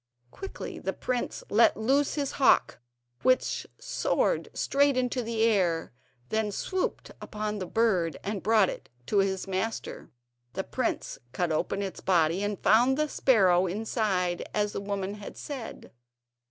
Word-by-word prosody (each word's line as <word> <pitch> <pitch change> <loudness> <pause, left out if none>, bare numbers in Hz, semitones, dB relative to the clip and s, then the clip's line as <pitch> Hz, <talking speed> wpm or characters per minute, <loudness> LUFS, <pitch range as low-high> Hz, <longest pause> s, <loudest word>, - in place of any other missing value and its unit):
Quickly 390 - -7
the - - -3
prince 250 -1 -3
let 225 +3 +5
loose 270 +6 +2
his 285 -3 -1
hawk, 270 - +3 0.4
which 255 0 +1
soared - - 0
straight 280 -1 +2
into 250 0 0
the 225 -1 -1
air, 180 - +1 0.4
then 220 -1 0
swooped 370 - -3
upon 210 0 -4
the 185 - -4
bird 185 -9 +1
and 200 -1 -3
brought 215 -2 +4
it - - -7 0.2
to 200 - +2
his 195 -1 0
master. 195 +2 -3 0.4
The - - -2
prince - - -3
cut 170 +5 0
open 195 +5 -1
its 195 - -5
body 170 0 +2
and 205 0 -1
found 245 +6 +5
the 305 0 +1
sparrow 190 -11 +3
inside, 190 -3 -1
as 210 -1 0
the - - -2
old 200 - -9
woman 200 -1 -2
had 205 -1 -9
said. 270 -6 -7
210 Hz, 150 wpm, -28 LUFS, 190-240 Hz, 0.4 s, let